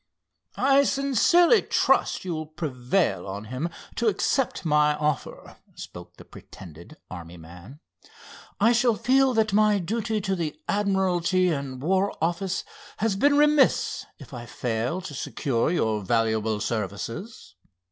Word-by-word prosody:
"I 275 +1 +4
sincerely 280 - +3
trust - - +1
you 180 - -2
will 155 -1 -5
prevail 130 - -1
on 100 +2 -6
him 150 +7 -2 0.3
to 235 - 0
accept 220 +2 0
my 150 -1 +3
offer," 150 -2 -4 0.2
spoke - - -11
the - - -13
pretended 85 - -13
army 85 -1 -9
man. 90 - -13 0.8
"I 225 +3 +4
shall 235 -1 +3
feel 260 +2 +2
that 220 -2 +1
my 210 0 +4
duty 220 +4 -2
to 195 -1 -2
the 165 -4 -4
admiralty 185 -3 +1
and 140 -5 -4
war 190 +4 0
office 175 +3 -1 0.3
has 215 -2 0
been 285 +8 +3
remiss 295 -1 +2
if 140 -3 -14
I 120 -1 -8
fail 120 +10 -3
to 170 -5 -8
secure 130 -2 -1
your 110 -11 0
valuable 110 0 0
services. 110 - -5
170 Hz, 135 wpm, -25 LUFS, -, 0.8 s, I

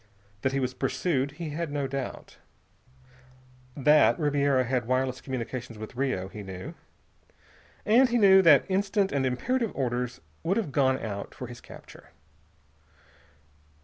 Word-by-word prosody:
That 130 - 0
he 135 - -1
was 130 -1 -2
pursued, 140 -1 -1
he 160 0 -6
had 160 0 -4
no 145 -1 -1
doubt. 135 -1 -6 1.4
That 150 +2 +5
Ribiera 140 -3 +2
had 125 -2 -1
wireless 130 0 0
communications 125 -2 -5
with 110 +2 -9
Rio, 125 -8 -1
he 105 +2 -9
knew. 95 -2 -8 1.1
And 245 +4 +5
he 240 - +1
knew 190 -3 +7
that 165 -6 +6
instant, 195 +1 0
and 135 -2 0
imperative 230 - -1
orders 125 -2 -2 0.2
would 185 +5 0
have 210 -11 -2
gone 130 -1 +2
out 100 -5 -6
for 125 - -6
his 120 -1 -10
capture. - - -14
135 Hz, 140 wpm, -27 LUFS, 125-165 Hz, 1.4 s, knew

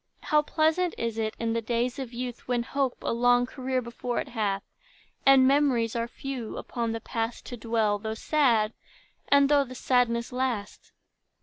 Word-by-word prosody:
How 300 -3 +3
pleasant 320 +3 +1
is 230 -1 -2
it, 220 0 -2
in 230 -1 -1
the 230 - 0
days 240 +4 -1
of 260 -3 -5
youth, 245 0 -6
When 245 -1 0
hope 270 0 -1
a - - 0
long 245 +1 +4
career 255 0 -2
before 235 +1 -3
it - - -4
hath, 205 -4 -1 0.6
And 270 -1 +7
memories 265 -5 +2
are 230 0 -1
few, 250 -2 -6
upon 235 -2 -3
the 225 - -3
past 225 +1 -3
To 245 - -6
dwell, 220 -2 0
though 220 +1 -4
sad, 230 -6 +2 0.5
and 280 0 +5
though 285 0 +4
the 255 -1 -10
sadness 240 -2 +1
last! 250 -5 -3
245 Hz, 175 wpm, -27 LUFS, 230-265 Hz, 0.6 s, And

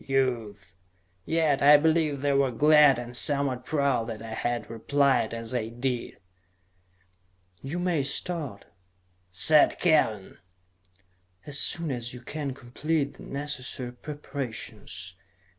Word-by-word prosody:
Youth!" 115 -8 -2 0.5
Yet 160 -4 +1
I 145 +1 +8
believe 155 -2 +1
they 145 -1 +2
were 140 -1 +3
glad 150 +2 +5
and 120 0 -5
somewhat 135 -2 +1
proud 140 -6 +1
that 115 -1 -7
I 110 -1 -7
had 120 +1 -2
replied 120 0 +1
as 115 +1 -6
I 115 -3 -1
did. 120 +1 -3 1.4
"You 140 +6 -5
may 175 -4 0
start," 140 - -4 0.7
said 150 - +5
Kellen, 130 - +1 1.1
"as 145 0 -1
soon 165 -4 0
as 120 -1 -4
you 125 - -10
can 140 0 -5
complete 145 +3 -2
the - - -14
necessary 130 -3 -5
preparations. 120 -10 -7
135 Hz, 120 wpm, -27 LUFS, 120-150 Hz, 1.4 s, I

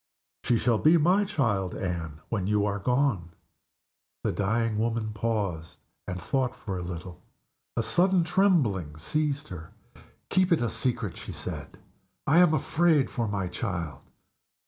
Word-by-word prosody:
"She 120 - +3
shall 115 -1 +2
be 160 +3 +6
my 180 +6 +3
child, 110 - 0
Anne, 85 -6 -4
when 100 -5 -1
you 105 0 +2
are 105 0 -1
gone." 125 -7 0 0.9
The - - +1
dying 110 +2 0
woman 115 -1 -1
paused, 105 -7 -2 0.3
and 90 0 -4
thought 130 +7 -1
for 100 -4 -5
a 90 - -3
little. 85 0 -7 0.6
A - - +2
sudden 185 0 +3
trembling 135 - +2
seized 145 - -1
her. 85 +2 -9 0.6
"Keep 185 -1 +3
it 165 - +3
a 120 - 0
secret!" 115 -5 -2
she - - -7
said. - - -6 0.5
"I 160 +5 +5
am 175 -3 +6
afraid 160 -3 +2
for 120 -3 -1
my 100 -3 -2
child." 90 - -4
110 Hz, 145 wpm, -27 LUFS, 90-145 Hz, 0.9 s, be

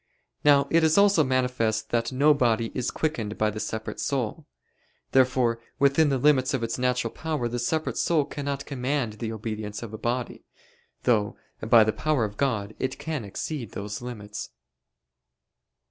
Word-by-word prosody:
Now 140 -1 +5
it 165 0 +4
is 160 +2 +4
also 200 -5 +5
manifest 125 -4 0
that 120 +1 0
no 145 +4 +5
body 115 -4 +1
is 125 - -1
quickened 115 -10 -2
by 110 0 +1
the 110 - -6
separate 110 +1 -4
soul. 140 +3 -2 0.6
Therefore 125 -3 +3 0.2
within 140 +2 +4
the 135 - +1
limits 135 -1 +3
of 125 - -2
its 115 +2 -2
natural 125 -2 0
power 155 -6 -2
the 120 +1 -3
separate 155 +6 -1
soul 160 -4 +2
cannot 140 -1 -4
command 130 -3 -2
the 115 -1 -3
obedience 110 -1 -5
of 110 -2 -8
a 110 - -6
body; 120 +1 -3 0.6
though, 105 -4 +1 0.2
by 110 0 +6
the 110 0 0
power 155 -7 +1
of 105 -1 -7
God, 110 -7 -1
it 130 0 -2
can 150 -3 -4
exceed 115 +4 -5
those 105 +2 -5
limits. 105 -4 -7
125 Hz, 160 wpm, -26 LUFS, 110-140 Hz, 0.6 s, by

